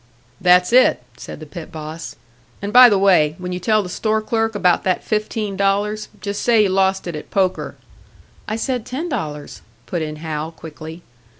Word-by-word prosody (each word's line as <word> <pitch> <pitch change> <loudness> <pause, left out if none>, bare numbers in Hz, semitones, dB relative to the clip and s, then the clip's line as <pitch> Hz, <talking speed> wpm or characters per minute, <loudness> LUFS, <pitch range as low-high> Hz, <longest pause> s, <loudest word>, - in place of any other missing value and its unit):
"That's 180 +3 +4
it," 250 - +5
said - - -9
the 155 - -9
pit 160 +2 -9
boss. 155 +1 -7 0.4
"And 200 +1 -5
by 250 0 +10
the 205 - +3
way, 180 -6 +4
when 180 0 -6
you 180 - -3
tell 215 +2 +2
the - - -6
store 215 +4 -1
clerk 225 0 -1
about 180 -3 +2
that 185 -1 0
fifteen 215 -1 -2
dollars, 205 +2 0
just 200 0 -4
say 230 -3 +4
you 200 - +1
lost 190 0 +1
it 175 -3 -5
at 150 - -8
poker." 190 -2 -1 0.7
"I 215 - -2
said 245 +1 -2
ten 290 +10 -5
dollars," 150 - -5 0.2
put 175 - -3
in 155 -1 -4
Hal, 155 0 -5
quickly. 160 +1 -10
190 Hz, 185 wpm, -20 LUFS, 160-215 Hz, 0.7 s, by